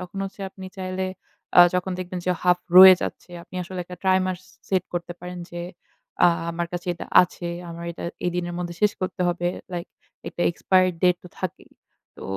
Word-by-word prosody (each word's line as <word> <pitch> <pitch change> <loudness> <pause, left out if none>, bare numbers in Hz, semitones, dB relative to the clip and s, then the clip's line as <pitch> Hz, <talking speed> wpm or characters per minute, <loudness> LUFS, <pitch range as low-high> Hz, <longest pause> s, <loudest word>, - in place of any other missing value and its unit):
তখন 185 +2 -8
হচ্ছে 195 +1 -9
আপনি 190 -1 -10
চাইলে 185 0 -3 0.5
অ্যা 175 - +10
যখন 180 +1 -1
দেখবেন 185 0 -5
যে, - - +3
হাফ 180 0 +4 0.2
রয়ে 190 0 +12
যাচ্ছে, - - -6
আপনি - - -18
আসলে 185 +1 -7
একটা 180 0 -10
ট্রাইমার্স 185 -1 +1
সে - - -26
সেট 190 -2 +1
করতে 175 0 -3
পারেন 180 0 -7
যে, 175 0 -6 0.6
অ্যা - - +7 0.2
"আমার 170 0 -3
কাছে 175 0 -5
এটা - - -8 0.2
আছে। 175 0 -5 0.2
আমার 170 0 -7
এটা - - -8 0.2
এই 180 - +1
দিনের 175 0 -3
মধ্যে 175 -1 -4
শেষ 210 - +4
করতে 185 0 -4
হবে।" 175 0 0 0.2
লাইক 175 0 -4 0.4
একটা 175 - -4
এক্সপায়রি 185 +2 +3
ডেট 180 -1 +5
তো - - -10
থাকেই। 185 -1 -5 0.5
তো - - -11
180 Hz, 195 wpm, -24 LUFS, 175-185 Hz, 0.6 s, রয়ে